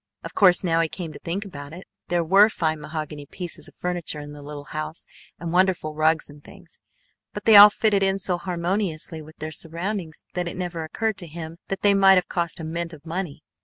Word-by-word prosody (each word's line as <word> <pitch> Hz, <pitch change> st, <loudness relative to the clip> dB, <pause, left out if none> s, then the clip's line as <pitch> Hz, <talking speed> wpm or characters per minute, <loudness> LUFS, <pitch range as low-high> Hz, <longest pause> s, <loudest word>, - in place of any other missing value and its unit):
Of -, -, -7 dB
course, 185 Hz, -3 st, +5 dB
now 165 Hz, -2 st, +2 dB
he 165 Hz, -, 0 dB
came 165 Hz, -3 st, -6 dB
to -, -, -10 dB
think 185 Hz, +5 st, -4 dB
about 145 Hz, -5 st, -9 dB
it, 180 Hz, +3 st, -10 dB, 0.2 s
there 175 Hz, -1 st, +1 dB
were 195 Hz, +6 st, +6 dB
fine 160 Hz, -6 st, -1 dB
mahogany 150 Hz, -1 st, -6 dB
pieces 175 Hz, +2 st, -5 dB
of -, -, -17 dB
furniture 175 Hz, -4 st, -3 dB
in 145 Hz, 0 st, -8 dB
the 145 Hz, -, -10 dB
little 145 Hz, 0 st, -8 dB
house 155 Hz, +2 st, -5 dB, 0.3 s
and 170 Hz, 0 st, -5 dB
wonderful 180 Hz, -4 st, +2 dB
rugs 155 Hz, +1 st, +2 dB
and 145 Hz, 0 st, -15 dB
things, 180 Hz, -4 st, -15 dB, 0.5 s
but -, -, -7 dB
they 220 Hz, -, +7 dB
all 205 Hz, +1 st, +12 dB
fitted 210 Hz, -1 st, +1 dB
in 195 Hz, 0 st, +2 dB
so 180 Hz, -2 st, -1 dB
harmoniously 175 Hz, -3 st, -2 dB
with 155 Hz, +1 st, -14 dB
their 155 Hz, +1 st, -5 dB
surroundings 170 Hz, +2 st, -3 dB
that 180 Hz, -1 st, -2 dB
it 170 Hz, -, -5 dB
never 175 Hz, -3 st, -3 dB
occurred 220 Hz, +6 st, -2 dB
to 175 Hz, -, -3 dB
him 165 Hz, +1 st, -8 dB
that 195 Hz, 0 st, -4 dB
they 205 Hz, -1 st, +5 dB
might 195 Hz, -1 st, +6 dB
have 180 Hz, -1 st, +2 dB
cost 170 Hz, -2 st, -2 dB
a -, -, -6 dB
mint 170 Hz, +1 st, -4 dB
of 150 Hz, 0 st, -13 dB
money. 165 Hz, -3 st, -5 dB
170 Hz, 220 wpm, -24 LUFS, 155-190 Hz, 0.5 s, all